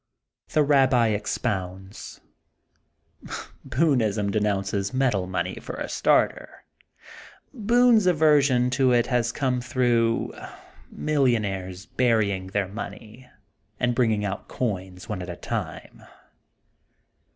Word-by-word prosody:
The 155 - +3
Babbi 130 -6 +3
expounds: 95 -2 -4 1.5
Boonism 115 -8 +1
de 110 - +1
nounces 100 0 -1
metal 120 -9 +1
money 90 0 -3
for - - -7
a - - -4
starter. - - 0 0.9
Boone's 235 -2 +4
aversion 145 -7 +4
to 130 -1 +3
it 120 -1 +3
has 120 -2 0
come 125 -2 -1
through 120 -2 +1 0.6
millionaires 100 -10 -1
burying 110 -6 +1
their 100 0 -1
money 105 +4 -9 0.5
and 120 0 +1
bringing 110 -4 +1
out 100 0 -4
coins 95 -6 -4
one 105 -4 -4
at 90 - -7
a 85 - -5
time. - - -6
115 Hz, 105 wpm, -25 LUFS, 100-130 Hz, 1.5 s, Boone's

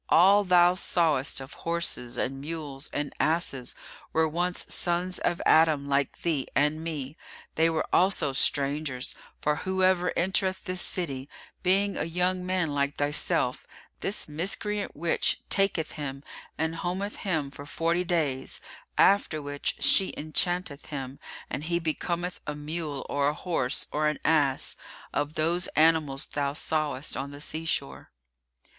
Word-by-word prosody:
All 195 +5 +6
thou 180 -1 +5
sawest 160 -8 +1
of 135 +1 -9
horses 165 -8 -2
and 135 +1 -2
mules 150 -2 -6
and 145 -1 -3
asses 155 -5 0 0.4
were 160 0 +3
once 175 +3 -1
sons 180 +1 0
of 175 - 0
Adam 155 -3 +4
like 140 -1 0
thee 155 -6 0
and 150 +4 +2
me; 150 -3 -4 0.4
they 165 +1 +3
were 160 -1 0
also 180 -7 +3
strangers, 140 -2 0 0.3
for 150 0 +2
whoever 185 0 +2
entereth 190 +1 +1
this 185 -2 -1
city, 140 -6 -2 0.3
being 195 +2 +2
a 150 - -1
young 180 +2 +1
man 180 -4 0
like 140 0 0
thyself, 145 0 +1 0.3
this 205 - 0
miscreant 200 +6 -2
witch 165 +3 +1
taketh 195 -5 +2
him 140 -2 -5 0.3
and 160 +1 -1
hometh 190 +4 -3
him 160 -8 -1
for 145 +1 -10
forty 170 +3 0
days, 150 -7 -1 0.4
after 195 -5 +4
which 145 -1 -3
she 190 - +3
enchanteth 155 0 0
him, 135 -2 -6 0.3
and 145 - -4
he 170 +1 +1
becometh 170 +2 -2
a 150 - -2
mule 150 -1 -4
or 140 0 +1
a 150 - -3
horse 155 -7 0
or 150 +1 +1
an 150 - 0
ass, 145 -4 +2 0.4
of 145 +2 -1
those 170 +3 +1
animals 155 -3 +3
thou 140 -1 -2
sawest 150 -2 -1
on 135 +1 -3
the 145 0 -10
sea 155 +2 -4
shore." 140 -4 -2
160 Hz, 145 wpm, -28 LUFS, 145-175 Hz, 0.4 s, All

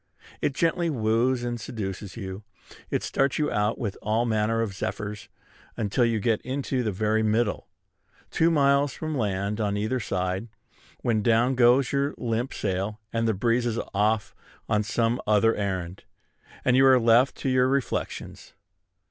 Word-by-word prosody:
It 140 - 0
gently 170 +2 +1
wooes 120 0 +1
and 120 -1 -3
seduces 100 -2 -6
you; 95 -2 -6 0.5
it - - -1
starts 135 -1 0
you 150 -1 0
out 105 +2 0
with 105 -4 -4
all 110 +3 +1
manner 110 0 +1
of 105 -4 -4
zephyrs, 105 +2 -5 0.5
until 105 +3 +1
you 115 -2 +1
get 110 +1 +1
into 130 0 -2
the 110 -3 -1
very 110 +3 +1
middle, 110 0 0 0.6
two 165 - +3
miles 140 -3 +3
from 155 -1 -4
land 105 -2 -1
on 100 -1 0
either 110 +5 -1
side, 95 0 -2 0.5
when 110 -3 +1
down 115 +4 +3
goes 125 +1 +4
your 140 +1 0
limp 120 +2 -2
sail, 100 +2 -3
and 115 0 0
the 110 - +1
breeze 120 +4 +1
is 115 -1 -2 0.2
off 105 +1 +1 0.3
on 105 -2 +2
some 115 +3 0
other 110 +2 +4
errand, 95 -3 -3 0.6
and 125 - +4
you 135 - +5
are 130 -1 +6
left 120 +3 +4
to 135 - -3
your 130 0 +3
reflections. 135 -1 -3
115 Hz, 160 wpm, -26 LUFS, 105-125 Hz, 0.6 s, are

